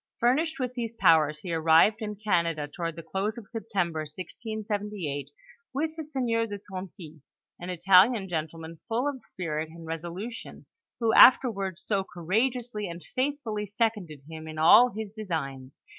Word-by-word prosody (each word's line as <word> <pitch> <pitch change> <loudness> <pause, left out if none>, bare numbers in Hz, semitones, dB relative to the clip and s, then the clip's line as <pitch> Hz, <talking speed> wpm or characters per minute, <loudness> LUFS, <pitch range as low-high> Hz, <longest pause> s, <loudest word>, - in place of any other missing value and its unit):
Furnished 280 +6 +2
with 250 -1 -2
these 235 -2 -4
powers, 155 -6 +4
he 180 -3 -4
arrived 165 +6 +5
in 210 -1 -4
Canada 170 -7 0
toward 165 +2 -5
the 165 - -8
close 195 +6 -2
of 220 -4 -9
September, 195 -8 -2
1678, 200 -1 -5 0.5
with 315 +3 -1
the 320 - -5
sieur 245 -6 -1
de 205 -1 -5
Tonty, 185 -5 -9 0.4
an 175 - -7
Italian 190 +4 +4
gentleman, 165 -1 -5
full 235 +4 0
of 275 -3 -4
spirit 160 -6 -4
and 165 0 -11
resolution, 175 +8 -7 0.3
who 230 -2 +2
after 255 -1 +8
ward 195 -4 -4
so 195 +1 -1
courageously 215 +5 -1
and 170 0 -8
faithfully 255 -6 -2
seconded 205 - -2
him 160 0 -8
in 155 0 -8
all 175 +10 +7
his 220 -2 -6
designs. 140 - -5
195 Hz, 150 wpm, -27 LUFS, 165-230 Hz, 0.5 s, after